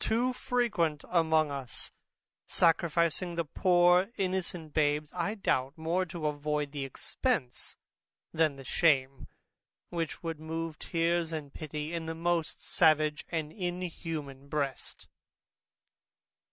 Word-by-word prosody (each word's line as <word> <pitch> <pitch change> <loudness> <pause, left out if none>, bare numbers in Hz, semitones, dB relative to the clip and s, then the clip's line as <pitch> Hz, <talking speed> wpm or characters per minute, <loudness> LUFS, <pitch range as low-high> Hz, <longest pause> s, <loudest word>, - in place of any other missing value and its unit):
too 240 +3 +2
frequent 225 - 0
among 160 -3 +3
us, 135 -4 -4 0.6
sacrificing 170 0 +3
the 170 -1 0
poor 175 +3 +4
innocent 180 -4 -2
babes, 150 -1 +2
I 180 +4 -1
doubt, 135 -8 0
more 170 +3 0
to 170 -3 -5
avoid 150 -1 -1
the 140 -2 -3
expence 135 - -2 0.6
than 160 -3 +3
the 135 - -10
shame, 135 -2 +2 0.6
which 165 -1 -3
would 165 -2 -3
move 160 0 -4
tears 170 -1 +1
and 150 -3 -5
pity 155 +1 -5
in 165 -1 -3
the 160 - -3
most 170 -1 -1
savage 155 -2 +3
and 160 -3 -2
inhuman 165 -7 -4
breast. 140 -2 -3
160 Hz, 115 wpm, -31 LUFS, 150-175 Hz, 0.6 s, poor